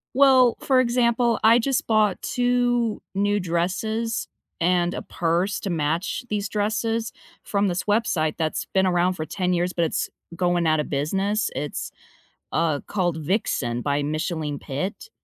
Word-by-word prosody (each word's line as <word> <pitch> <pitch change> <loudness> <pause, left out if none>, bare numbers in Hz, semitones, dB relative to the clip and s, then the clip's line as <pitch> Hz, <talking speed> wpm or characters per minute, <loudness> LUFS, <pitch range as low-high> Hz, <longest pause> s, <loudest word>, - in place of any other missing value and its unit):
Well, 260 -3 +6
for 260 -2 +3
example, 235 -1 +2
I 230 +2 +7
just 265 +2 0
bought 215 -4 +2
2 245 -2 +1
new 205 +1 +1
dresses 195 +6 -1 0.3
and 175 +1 +2
a - - -4
purse 175 +4 -1
to 200 - -3
match 165 +7 -1
these 205 -1 -2
dresses 220 +2 -1 0.3
from 200 -1 0
this 180 0 -1
website 205 -8 +1
that's 160 -2 -1
been 190 0 +3
around 180 +1 +2
for 155 -3 -5
10 180 +3 -1
years, 175 +1 0
but 170 -1 +1
it's - - -2 0.3
going 175 -1 +1
out 155 -1 +3
of 150 - -2
business. 195 +9 0
It's, 145 0 -4 0.6
uh, 160 -3 +1
called 175 -5 0
Vixen 145 - -1
by 145 +1 0
Micheline 155 0 -2
Pitt, 185 - -5
185 Hz, 150 wpm, -24 LUFS, 165-225 Hz, 0.6 s, I